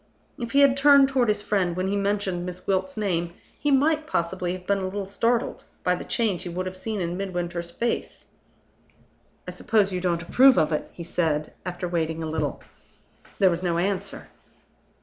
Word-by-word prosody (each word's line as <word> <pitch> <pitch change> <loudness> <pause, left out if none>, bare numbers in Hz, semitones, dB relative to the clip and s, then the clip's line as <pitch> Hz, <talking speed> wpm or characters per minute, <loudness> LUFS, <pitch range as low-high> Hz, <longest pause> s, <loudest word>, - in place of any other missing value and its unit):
If 235 -2 -5
he 280 - +5
had 275 -2 +6
turned 280 -1 +6
toward 260 -3 +2
his 210 -1 0
friend 190 -5 0
when 185 +1 -1
he 200 - 0
mentioned 200 -3 -1
Miss 180 0 -6
Gwilt's 185 0 -1
name 175 -5 -1 0.2
he 295 - 0
might 305 +3 +2
possibly 180 - -1
have 185 0 -8
been 200 +1 +1
a 190 - -3
little 195 +1 -3
startled 230 +4 -1 0.2
by 180 - +3
the 180 - -4
change 215 -7 0
he 175 - -5
would 180 +2 -3
have 185 0 -5
seen 210 +3 -4
in 175 +1 -2
Midwinter's 175 -3 -3
face. 235 +7 -3 1.2
"I - - -4
suppose 205 -4 +1
you 180 - -2
don't 170 -2 0
approve 260 +8 +6
of 155 +1 +3
it?" 150 - -2
he 170 - -8
said, 160 -3 -1
after 180 0 -3
waiting 165 -2 -2
a 160 - -3
little. 155 -3 -2 0.7
There 190 -2 +5
was 170 +1 -2
no 175 -2 0
answer. 190 +2 -2
185 Hz, 190 wpm, -25 LUFS, 175-210 Hz, 1.2 s, had